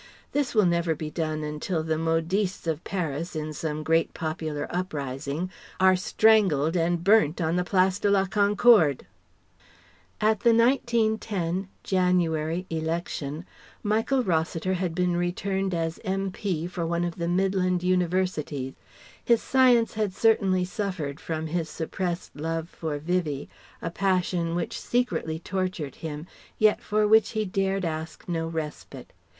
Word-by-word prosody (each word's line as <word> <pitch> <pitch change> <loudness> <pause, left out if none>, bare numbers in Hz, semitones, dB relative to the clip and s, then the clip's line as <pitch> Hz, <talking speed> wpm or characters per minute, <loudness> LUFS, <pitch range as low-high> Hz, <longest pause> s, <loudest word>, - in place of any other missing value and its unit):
This 280 -4 -1
will 210 -3 +5
never 170 -2 +1
be 155 0 -5
done 155 -1 -2
until 150 +2 -2
the 160 0 0
modistes 165 +5 0
of 160 0 -2
Paris, 170 -3 -3
in 155 0 -3
some 155 0 -3
great 165 +1 +1
popular 155 -2 -3
uprising, 150 -1 -3 0.3
are 190 0 +6
strangled 185 -6 +3
and 170 0 +1
burnt 195 -5 +4
on 165 0 0
the 180 - +1
Place 185 +1 +2
de 205 - +1
la 195 -1 +3
Concorde. 205 - +4 1.1
At 215 -1 +2
the 230 +1 +4
1910 220 -7 +1 0.2
(January) 180 -2 +1
Election, 160 -1 -3 0.4
Michael 225 +5 +1
Rossiter 165 0 0
had 180 -2 -2
been 180 0 +1
returned 190 +2 -1
as 165 -1 -2
M.P. 190 -3 -2
for 175 -1 -4
one 170 +1 0
of 175 -1 -3
the 170 -1 -2
Midland 185 0 +1
Universities. 180 -7 0 0.5
His 235 -1 +3
Science 250 -3 +4
had 210 -4 -1
certainly 195 -5 +3
suffered 180 -7 -4
from 160 -1 -4
his 160 0 -2
suppressed 175 +2 -4
love 165 +2 -3
for 155 -5 -4
Vivie, 155 -3 -2 0.3
a 165 - -2
passion 180 -3 0
which 175 -1 -3
secretly 240 -10 -1
tortured 185 -4 -3
him, 155 -1 -6 0.3
yet 215 -1 +4
for 210 0 +1
which 220 +2 +4
he 215 -1 0
dared 195 0 0
ask 160 0 -5
no 165 -2 -1
respite. 150 -5 -6
175 Hz, 140 wpm, -26 LUFS, 160-195 Hz, 1.1 s, are